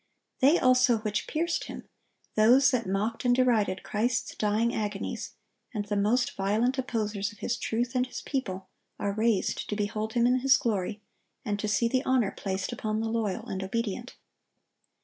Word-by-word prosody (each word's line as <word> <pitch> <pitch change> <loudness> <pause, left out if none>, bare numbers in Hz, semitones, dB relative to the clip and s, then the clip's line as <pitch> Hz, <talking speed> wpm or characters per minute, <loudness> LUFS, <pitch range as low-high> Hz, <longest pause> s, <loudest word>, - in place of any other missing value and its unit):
"They 285 +6 +5
also 250 -2 +4
which 215 -1 -2
pierced 335 +2 -1
Him,"(1097) - - -8 0.5
those 250 +6 +5
that 235 -5 0
mocked 210 +4 -1
and 245 -1 +4
derided 230 -7 +2
Christ's 230 +3 -1
dying 220 +3 +1
agonies, 210 -2 -4 0.4
and 205 -1 -2
the 205 0 -2
most 215 +5 +1
violent 220 +7 +1
opposers 215 -5 -2
of 210 - -16
His 235 - -2
truth 240 +2 -2
and 250 0 +1
His - - -7
people, 190 -9 -3 0.3
are 200 - -1
raised 220 -1 0
to 210 - -1
behold 215 +1 -2
Him 235 -1 +3
in 250 +1 +3
His 265 +1 +5
glory, 210 -3 -2 0.4
and 205 -1 -1
to 215 - -2
see 230 +2 +2
the 255 +2 +1
honor 250 -7 +2
placed 190 +1 -3
upon 215 -2 -2
the 225 0 -1
loyal 220 -4 -1
and 190 - -4
obedient. 230 +4 -3
225 Hz, 170 wpm, -28 LUFS, 205-245 Hz, 0.5 s, They